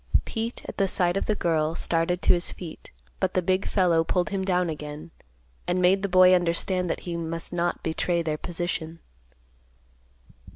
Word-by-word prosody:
Pete, 230 +1 -4
at 195 -2 -1
sight 175 -2 +1
of 195 - -1
the 215 - +1
girl, 160 -3 0
started 170 +1 0
to - - +6
his 175 0 +1
feet, 170 -4 -9 0.3
but - - -1
the 185 - +3
big 185 +2 0
fellow 175 -4 +3
pulled 180 +4 -1
him 195 -1 -1
down 180 -2 +1
again, 150 0 -7 0.6
and 180 +1 +1
made 185 +2 +4
the 200 - -2
boy 185 0 +6
understand 180 +1 +1
that - - -2
he 175 -1 -5
must 165 0 -3
not 175 0 -1
betray 170 +1 0
their 155 -1 -2
position. 170 -1 -4
175 Hz, 170 wpm, -26 LUFS, 165-185 Hz, 0.6 s, to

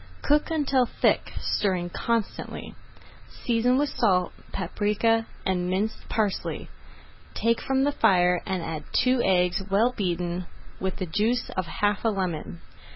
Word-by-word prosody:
Cook 295 +1 +3
until 275 -6 +2
thick, - - +1
stirring 180 -3 0
constantly. 230 +1 -3 0.7
Season 245 +2 +3
with 290 +1 +1
salt, 185 -9 +1 0.2
paprika, 210 +4 +1 0.2
and 180 -1 0
minced 200 +4 -2
parsley, 210 -3 -1 0.7
take 230 0 +1
from 270 0 +1
the 290 - +2
fire, 180 -8 +3
and 185 -3 -1
add 160 -2 -4
two 255 -1 +3
eggs 180 -1 +2
well 215 +5 +3
beaten 175 -2 -2 0.3
with 190 0 -2
the 185 - -3
juice 215 +8 0
of 185 -2 -2
half 205 +5 0
a 225 - +3
lemon. 165 - -3
200 Hz, 135 wpm, -26 LUFS, 180-230 Hz, 0.7 s, Cook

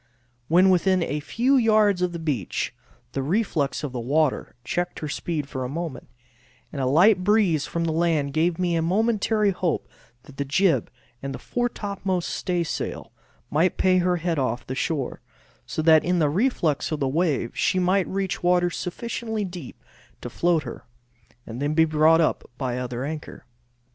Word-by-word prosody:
When 185 +4 +5
within 185 0 +3
a 150 -1 -2
few 235 - +1
yards 215 -5 +3
of 180 -1 +1
the 170 - -5
beach, 145 - -2 0.4
the 135 - -2
reflux 155 -4 0
of 145 - -3
the 125 - -4
water 145 +4 0
checked 175 +6 -2
her 155 - -4
speed 150 0 -3
for 130 -2 -4
a 125 - -4
moment, 160 -2 -5 0.7
and 140 - -3
a 130 - +1
light 180 +7 +5
breeze 190 -7 +2
from 170 - -2
the 165 - 0
land 155 -4 +1
gave 165 +2 +1
me 180 -2 0
a 165 - +1
momentary 210 +3 +2
hope 180 -3 -2 0.4
that 135 -1 -15
the 140 - 0
jib 165 +6 +2 0.3
and 135 -1 -4
foretopmost 200 -6 -2
staysail 175 -3 -3 0.4
might 165 +5 +2
pay 185 -1 +3
her 180 0 +2
head 170 -2 -1
off 125 -2 -1
shore, 145 -1 -2 0.5
so 155 - -3
that 160 -1 +6
in 180 +1 +1
the 155 -3 +3
reflux 170 - 0
of 155 - -2
the 135 - 0
wave 145 -4 0
she - - +1
might 185 +1 +2
reach 190 -1 -2
waters 175 0 +2
sufficiently 220 +2 -3
deep 175 -8 -9 0.4
to - - -6
float 170 -2 +1
her, - - -9 0.6
and 120 +3 -7
then 145 +2 0
be 160 0 +5
brought 155 +1 +4
up 160 - 0
by 130 -3 -2
the 125 - -3
other 125 +1 -4
anchor. 155 +1 -7
170 Hz, 175 wpm, -24 LUFS, 145-185 Hz, 0.7 s, that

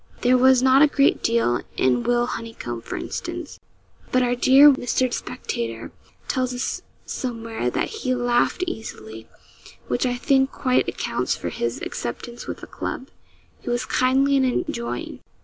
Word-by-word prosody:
There 250 +1 +4
was 260 0 +5
not 265 +1 +6
a 305 - +8
great 280 -1 +2
deal 230 - +1 0.2
in 125 -2 +2
Will 240 - +2
Honeycomb, 225 - -6
for - - -6
instance; - - -6 0.5
but 255 0 +3
our 245 0 +1
dear 270 +4 +7
Mr. 255 -1 0
Spectator 115 - -4 0.4
tells 255 -1 -1
us 245 - -3 0.2
somewhere 230 - -3
that - - -1
'he 270 -13 -2
laughed 245 +8 +1
easily,' 110 - -7 0.6
which 120 - 0
I 245 - -1
think 265 +2 +2
quite 255 -2 +1
accounts - - -2
for - - -4
his - - -3
acceptance 240 -1 -6
with - - -6
the - - -7
club. 265 - -6 0.5
He - - -6
was 240 +1 0
kindly 270 +2 +2
and 265 - +3 0.2
enjoying. 235 -6 -4
245 Hz, 150 wpm, -23 LUFS, 230-260 Hz, 0.6 s, a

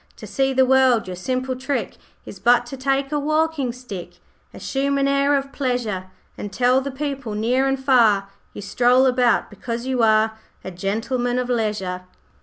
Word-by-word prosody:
To - - -11
see 270 0 0
the 260 0 +3
world, 260 -3 +3
your 185 -1 -6
simple 255 +7 -2
trick 260 -4 -3 0.3
Is 195 - -10
but 245 +2 +4
to 245 - -7
take 270 +1 -1
a 295 - 0
walking 310 -3 0
stick 235 -8 -9 0.3
Assume 280 +1 -2
an 275 0 +1
air 280 +1 +2
of 275 0 -5
pleasure, 240 -8 -2 0.3
And 205 - -6
tell 250 +3 +2
the 275 - -4
people 275 -5 -4
near 250 +5 +1
and 270 0 0
far 230 -7 +3 0.2
You 205 - -8
stroll 245 +6 +3
about 250 -3 +2
because 230 +3 -5
you 260 -2 0
are 220 0 +3 0.2
A 185 - -6
Gentleman 225 +7 -2
of 250 0 -2
Leisure.' 210 -6 -2
250 Hz, 175 wpm, -21 LUFS, 220-270 Hz, 0.3 s, but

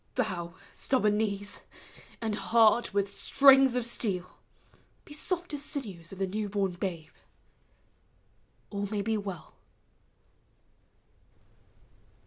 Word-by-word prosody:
Bow, 180 -8 -2 0.2
stubborn 215 -6 +1
knees; 205 -2 -2 0.6
and 220 -2 -1
heart 220 +4 +4
with 200 0 0
strings 270 -2 +6
of 250 -2 0
steel, 195 -6 -2 0.7
He 295 - -11
soft 350 +2 -3
as 290 -1 -3
sinews 200 - -6
of 195 - -9
the 195 - 0
new 205 +2 -3
born 195 -2 0
babe! 175 -3 -5 1.6
All 200 -1 -2
ma 210 +1 -3
v - - +1
be 220 +1 0
well. 195 -5 -7
205 Hz, 115 wpm, -29 LUFS, 195-240 Hz, 1.6 s, strings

